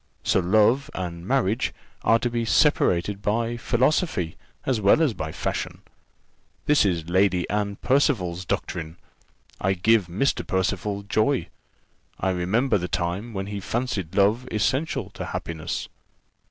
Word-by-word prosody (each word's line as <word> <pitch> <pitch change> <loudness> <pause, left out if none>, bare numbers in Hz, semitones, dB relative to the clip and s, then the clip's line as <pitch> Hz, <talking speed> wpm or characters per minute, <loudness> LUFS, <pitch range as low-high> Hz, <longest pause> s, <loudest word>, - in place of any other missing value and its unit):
So - - +3
love 110 +9 +3
and 85 -1 -5
marriage 125 -3 +1 0.3
are 115 - +4
to 120 - -1
be 120 -1 -1
separated 100 - +2
by 115 +3 0
philosophy, 120 - +1 0.3
as 125 -5 0
well 100 +9 +5
as 155 -7 +2
by 80 -5 -5
fashion. - - -4 0.8
This 150 -6 +4
is 85 -4 0
Lady 90 -1 +2
Anne 100 -1 -1
Percival's 100 - +1
doctrine! 85 -2 -3 0.6
I 95 +1 +1
give 105 +1 +3
Mr. 100 +11 0
Percival 100 +2 -1
joy. 110 +6 +1 0.7
I 95 - +1
remember 105 +6 +1
the 90 - -3
time, 90 +8 -2
when 95 0 -2
he 100 0 -5
fancied 100 -6 -3
love 105 +5 +3
essential 130 - 0
to - - -6
happiness." 80 -2 -4
100 Hz, 135 wpm, -25 LUFS, 90-120 Hz, 0.8 s, well